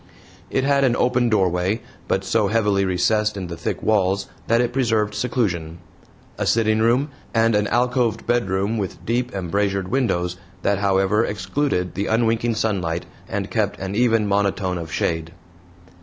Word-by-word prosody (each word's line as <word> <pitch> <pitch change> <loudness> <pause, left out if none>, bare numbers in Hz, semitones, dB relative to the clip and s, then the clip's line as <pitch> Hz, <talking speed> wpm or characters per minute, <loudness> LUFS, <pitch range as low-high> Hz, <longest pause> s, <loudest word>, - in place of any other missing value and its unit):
It 130 - 0
had 140 0 +3
an 125 -3 +3
open 125 -1 +2
doorway, 95 0 +1 0.3
but 95 - 0
so 105 +1 +1
heavily 105 -2 +2
recessed 105 +3 +1
in 95 - -4
the 85 -1 -6
thick - - -4
walls 100 -2 +1 0.2
that 115 +1 +3
it 120 0 0
preserved 110 -5 +1
seclusion, 95 -11 -1 0.6
a - - 0
sitting 110 -1 +2
room, 120 +6 +2 0.3
and 115 0 +3
an 105 0 +2
alcoved 120 -1 +1
bedroom 105 -2 0
with 95 -3 -5
deep 120 +2 0
embrasured 95 +1 -1
windows 90 -9 0 0.3
that 100 -1 +1
however 100 +2 +2
excluded 105 -3 -1
the 100 - -2
unwinking 115 +1 +1
sunlight 90 -7 -1 0.2
and - - -3
kept - - 0
an 95 +1 -4
even 115 -1 +3
monotone 100 -2 0
of 80 -1 -7
shade. 80 +2 -2
105 Hz, 155 wpm, -22 LUFS, 95-115 Hz, 0.6 s, had